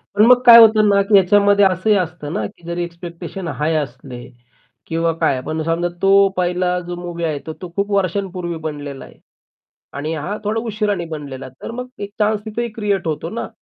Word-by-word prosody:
पण 210 +2 +5
मग 250 +1 +6
काय 235 -1 +11
होतं 215 -2 +6
ना, 200 0 +4
की 200 +2 -2
ह्याच्यामध्ये 200 +1 +5
असंही 190 +3 +2
असतं 175 -5 -3
ना 110 - -2
की 170 - -21
जरी 170 0 -2
एक्स्पेक्टेशन 170 +1 -7
हाय 160 0 -1
असले 130 -3 -5 0.6
किंवा 165 0 0
काय, 140 -5 0
पण 155 +4 -4
समजा 165 +2 0
तो 195 0 +5
पहिला 180 0 0
जो 175 0 -6
मूव्ही 175 -1 -5
आहे, 155 -3 -2
तर - - -3
तो 180 - -7
खूप 200 +1 -1
वर्षांपूर्वी 185 -2 -1
बनलेला 145 -3 -7
आहे - - -18 0.8
आणि 155 +3 -3
हा 170 +8 -4
थोडा 215 +2 -1
उशिराने 210 -5 -2
बनलेला 145 -5 -7
आहे, 130 - -12
तर - - -5
मग 250 +2 -6
एक 200 - -4
चान्स 210 0 +1
तिथेही 235 +2 -3
क्रिएट 205 -5 -2
होतो 160 +1 -3
ना. 230 +5 -5
180 Hz, 195 wpm, -19 LUFS, 160-205 Hz, 0.8 s, काय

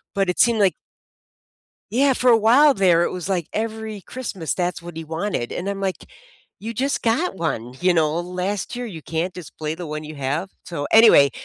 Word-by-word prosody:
but 195 -2 +1
it 180 - -2
seemed 235 -2 +4
like 195 -2 +3 1.2
Yeah, 270 +3 +4
for 250 0 +3
a 230 - +7
while 265 +7 +6
there, 180 -6 +3
it - - 0
was 185 +1 -5
like 180 -5 -1
every 220 -1 -4
Christmas, 195 -8 -5
that's 180 -1 -2
what 170 -1 -10
he 165 - -4
wanted, 160 -5 -3
and 185 +3 -4
I'm 200 0 -3
like, 190 -1 -3 0.5
you 225 +2 -5
just 270 +4 -1
got 240 - +1
one, 125 -8 -3
you 180 0 +3
know, 160 0 +1
last 180 +6 -3
year 245 0 -4
you 165 -8 -8
can't 165 +3 -3
just 180 -5 -11
play 155 0 -3
the 170 -2 -7
one 155 0 -5
you 155 0 -8
have. 145 +7 -3
So, 145 -4 -4
anyway, 220 -11 +7
185 Hz, 205 wpm, -22 LUFS, 165-220 Hz, 1.2 s, a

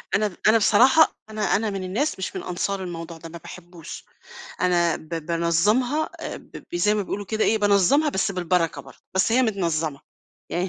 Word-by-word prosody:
أنا 210 +1 +2
د 180 - -11
أنا 225 +1 +6
بصراحة 255 +9 +5
أنا 215 -1 0
أنا 215 +1 0
من 195 -2 -4
الناس 220 +7 -2
مش 190 - -4
من - - -4
أنصار 190 +2 -3
الموضوع 165 -1 -7
ده، 165 +1 -10
ما 170 - -9
باحبوش، 170 -1 -11 0.6
أنا 175 -2 +2
ب 155 - -15
بانظّمها 170 - +1 0.3
ب - - -9
زي 210 +4 +2
ما 210 - 0
بيقولوا 205 +2 -4
كده 220 0 0
إيه 220 - +2
بانظّمها 205 - +3
بس 195 -5 0
بالبركة 180 -2 0
برضه، - - -16 0.2
بس 190 +4 +2
هي 255 +2 +4
متنظّمة، 165 - -1 0.5
يعني 180 +2 -1
190 Hz, 180 wpm, -24 LUFS, 170-215 Hz, 0.6 s, أنا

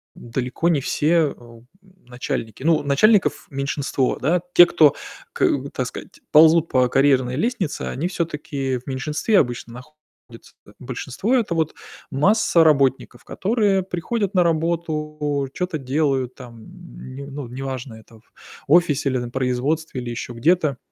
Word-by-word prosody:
далеко 125 +7 -2
не 160 -4 +2
все, 150 +4 0
э, 155 -3 +2
у, 120 -1 -15 0.2
м, 185 -4 -26
начальники. 125 -1 -5
Ну 160 0 +3
начальников 190 +9 +3
меньшинство, 140 -1 -1
да. 165 +6 +1
Те, 175 - +9
кто 155 -5 +4 0.4
к - - +1 0.3
так - - -3
сказать, - - -10
ползут 160 +1 +6
по 130 -1 +3
карьерной 130 -2 +2
лестнице, 185 - -2
они 155 +7 -3
всё-таки 150 -7 -3
в 125 - -14
меньшинстве 150 - 0
обычно 120 -2 -2 0.6
находятся-то. 115 -3 -17
Большинство- 130 - -2
это 230 -8 0
вот 160 -2 -1 0.3
масса 175 +3 +3
работников, 135 -5 +1
которые 200 -2 0
приходят 195 +3 -3
на 185 - +3
работу, 155 -4 -1
чё-то 180 -3 -3
делают 135 -2 -1
там 120 -4 -13 0.5
не 140 +1 -8
ну 140 -2 -7
неважно, 130 0 -6
это 110 +1 -17
в - - -30 0.4
офисе 150 -3 +3
или 130 - -1
на 120 -1 -5
производстве, 130 +3 -2
или 120 - -6
ещё 120 +1 -6
где-то. 150 +2 +1
145 Hz, 145 wpm, -21 LUFS, 130-170 Hz, 0.6 s, Те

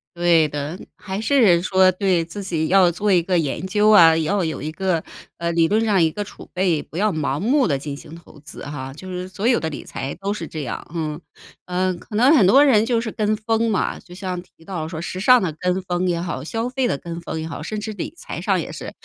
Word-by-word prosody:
对 170 -2 +4
的， 145 +3 -5 0.2
还 195 0 -5
是 220 -9 +4
说 185 0 +4
对， 185 -3 +1
自 185 +5 -7
己 165 -4 -1
要 185 -1 +5
做 205 +4 0
一 180 -2 +5
个 180 +1 0
研 160 +2 -2
究 210 +2 +3
啊， 165 -6 +7
要 180 +5 0
有 160 -1 -3
一 155 +2 -4
个 180 0 -1 0.4
呃， 170 0 -2
理 165 -1 +3
论 220 +4 +1
上 200 -4 +3
一 160 -1 +3
个 205 - -4
储 200 - -13
备， 180 -4 +1
不 160 - -10
要 210 +3 +2
盲 145 -4 -2
目 255 +5 +2
地 140 -5 +1
进 140 +1 -6
行 150 - -12
投 170 -3 -15
资 145 -1 -10
哈， 135 -2 -6
就 175 +6 -11
是 180 0 -5
所 195 +4 -2
有 245 - +4
的 160 - -3
理 150 - -7
财 135 - -5
都 195 +3 -3
是 210 - -6
这 155 -2 -6
样。 120 - -5
嗯， 155 -2 -3 0.5
呃， 185 +1 0
可 180 +5 -10
能 255 +8 +5
很 225 -10 +5
多 270 +9 +7
人 225 -7 +5
就 235 -1 +1
是 225 -1 -4
跟 215 0 0
风 225 +1 0
嘛， 210 - -1
就 175 - -15
像 185 -1 -4
提 165 -2 -22
到 170 -5 -4
说 160 -1 -6
时 175 +2 -5
尚 250 +5 +6
的 175 -5 -2
跟 180 +1 0
风 180 0 -1
也 175 -1 0
好， 170 -6 -4
消 225 +9 -3
费 260 0 0
的 140 - -1
跟 170 +3 -7
风 160 - -5
也 160 - -4
好， - - -7
甚 215 - -4
至 215 +1 -5
理 205 - -6
财 - - -7
上 - - +1
也 - - -5
是， - - -7
180 Hz, 270 characters per minute, -21 LUFS, 160-210 Hz, 0.5 s, 啊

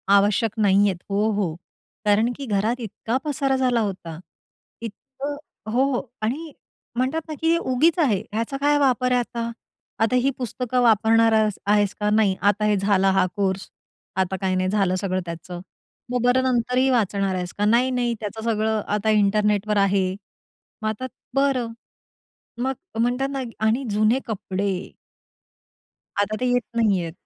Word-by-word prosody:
आवश्यक 205 +2 +3
नाहीयेत. 200 -1 +4
हो, 205 +2 +1
हो, 200 -6 -1 0.5
कारण 215 +4 +3
की 275 - -6
घरात 220 +3 0
इतका 225 +3 -3
पसारा 280 -2 0
झाला 250 -2 +2
होता, 180 -6 -4 0.6
इतकं 270 +6 -6 0.4
हो, 250 +4 +3
हो. - - 0 0.2
आणि 290 +9 -2 0.5
म्हणतात 265 +6 0
ना 310 - -5
की 325 +1 +3
उगीच 310 +3 +2
आहे, 240 - +3
ह्याचा 230 +5 -2
काय 290 +1 +3
वापर 255 -2 +2
आहे 250 - +4
आता? 235 -1 -3 0.5
आता 250 +3 +2
ही 255 +2 +3
पुस्तकं 250 0 -1
वापरणार 225 0 +4
आहेस 215 -2 +2
आहेस 205 -1 +3
का 210 0 +1
नाही? 210 -3 +3
आता 205 +2 +2
हे 210 - +3
झाला 195 -1 +3
हा 190 -1 +3
कोर्स, 195 -2 -1 0.5
आता 190 0 0
काही 190 -1 +1
नाही 185 0 +1
झालं, 195 -2 +1
सगळं 185 -1 -1
त्याचं. 170 +1 -7 0.5
मग 250 -1 0
बरं, 245 +1 +4
नंतरही 250 +1 +2
वाचणार 200 -5 +1
आहेस 180 -1 -4
का 205 - +1
नाही? 235 +4 +4
नाही-नाही, 245 -2 0
त्याचं 220 +1 -5
सगळं 220 0 0
आता 210 +1 0
इंटरनेटवर 210 0 +2
आहे. 195 -1 +3 0.8
मग 215 - 0
आता 220 +4 -4 0.3
बरं, 270 -4 +1 0.9
मग 265 +1 0 0.3
म्हणतात 250 +3 +1
ना, 270 - -2 0.3
आणि 235 +5 +1
जुने 215 +4 +2
कपडे 200 -2 -2 1.5
आता 215 +1 -2
ते 255 - +1
येत 245 0 +2
नाहीयेत 195 -8 +1
220 Hz, 155 wpm, -23 LUFS, 200-250 Hz, 1.5 s, नाहीयेत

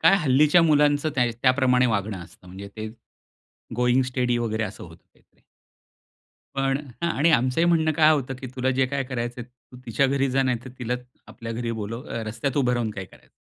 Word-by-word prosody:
काय 195 - +6
हल्लीच्या 150 +4 +4
मुलांचं 150 -1 +3
त्या 125 -2 +3 0.2
त्याप्रमाणे 125 -1 +4
वागणं 100 -3 -1
असतं. 90 - -19
म्हणजे 95 +2 -9
ते 110 0 -5 0.9
गोइंग 125 +1 +3
स्टेडी 125 -1 +1
वगैरे 110 -1 -1
असं 100 -2 -8
होतं 80 -1 -15
ते - - -28 1.3
पण 135 0 0 0.2
हां, 170 - +1
आणि 160 +5 +4
आमचंही 130 +4 +2
म्हणणं 160 -2 +3
काय 155 0 +5
होतं, 135 -3 -1
की 130 - -6
तुला 130 +1 +1
जे 130 0 +2
काय 140 0 -2
करायचंय 120 -2 -4
तू 125 0 -20
तिच्या 120 +4 +2
घरी 135 0 +1
जा 135 +1 +2
नाहीतर 125 -1 -2
तिलाच 125 +1 -3 0.2
आपल्या 115 0 -7
घरी 115 0 -3
बोलव 115 +6 -5 0.2
रस्त्यात 125 +5 -3
उभं 125 -3 +2
राहून 115 -3 -1
काय 95 -2 -6
कराय - - -20
125 Hz, 185 wpm, -24 LUFS, 115-140 Hz, 1.3 s, काय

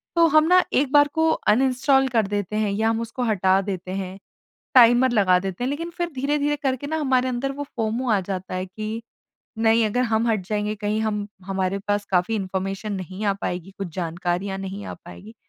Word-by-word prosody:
तो 335 -1 +6
हम 310 0 +5
ना 365 +1 +6
एक 270 0 +2
बार 290 0 +6
को 320 0 +3
अनइंस्टॉल 265 +2 +2
कर 225 -4 +1
देते 205 0 -3
हैं 215 -1 +1
या 220 +3 +1
हम 225 0 0
उसको 230 +2 -4
हटा 190 -4 +2
देते 185 -2 -5
हैं, 190 0 -4 0.6
टाइमर 245 +1 +7
लगा 190 -5 +4
देते 190 +4 -4
हैं। - - 0
लेकिन 330 +4 -4
फिर 345 0 -1
धीरे-धीरे 290 +2 0
करके 270 -1 -2
ना 315 - -2
हमारे 260 -3 +1
अंदर 255 +2 -2
वो 285 +1 -5
फोमो 230 +2 -1
आ 210 -3 +3
जाता 185 0 -5
है 185 0 -3
कि 215 +4 -5 0.6
नहीं 225 0 +4
अगर 245 +4 0
हम 220 +2 +2
हट 215 -2 +1
जाएँगे 210 0 -1
कहीं 210 +1 -1
हम 210 -2 -1 0.2
हमारे 195 0 -1
पास 205 0 +1
काफ़ी 180 +4 +1
इन्फॉर्मेशन 195 +2 -3
नहीं 190 +1 -5
आ 200 - +3
पाएगी, 180 +1 -3
कुछ 195 -2 -4
जानकारियाँ 180 +2 -2
नहीं 195 +1 -6
आ - - -6
पाएगी, 200 +5 -12
215 Hz, 200 wpm, -23 LUFS, 195-255 Hz, 0.6 s, टाइमर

